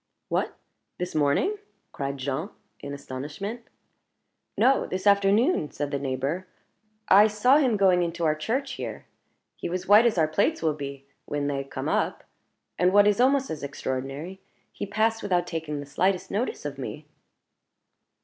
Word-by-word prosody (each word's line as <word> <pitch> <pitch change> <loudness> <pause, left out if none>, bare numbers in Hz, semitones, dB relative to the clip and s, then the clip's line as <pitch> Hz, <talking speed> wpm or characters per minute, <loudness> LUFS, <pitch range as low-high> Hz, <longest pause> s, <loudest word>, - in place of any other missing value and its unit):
"What! - - -1 0.4
this 180 0 -4
morning?" 155 - +2 0.3
cried 140 0 -4
Jean, 140 +7 -3 0.3
in 140 - -7
astonishment. 145 - -6 1.0
"No; 270 +1 +3
this 185 +1 -4
afternoon," 200 - +3
said 145 -1 -4
the 140 - -1
neighbor 140 +7 -2 0.6
"I 205 +3 +7
saw 220 +6 +4
him 250 -7 +2
going 185 -3 +4
into 170 0 -1
our 155 - +3
church 250 - -2
here. - - -6 0.5
He - - -4
was 180 +1 -2
as - - -17
white 210 +4 +7
as 220 - 0
our 160 -2 +4
plates 155 +1 0
will 155 -1 +2
be 140 -2 -7 0.2
when 145 -1 -2
they 140 -1 -1
come 135 - -5
up. - - 0 0.6
And 180 +1 +4
what 205 +1 +6
is 210 +3 +3
almost 270 +1 +3
as 155 - -5
extraordinary, 140 +5 -5 0.3
he - - -5
passed 225 +2 +1
without 180 -3 +1
taking 160 -4 -4
the 145 - -6
slightest 180 +6 0
notice 245 - -2
of - - -5
me." - - -6
175 Hz, 160 wpm, -26 LUFS, 145-210 Hz, 1.0 s, I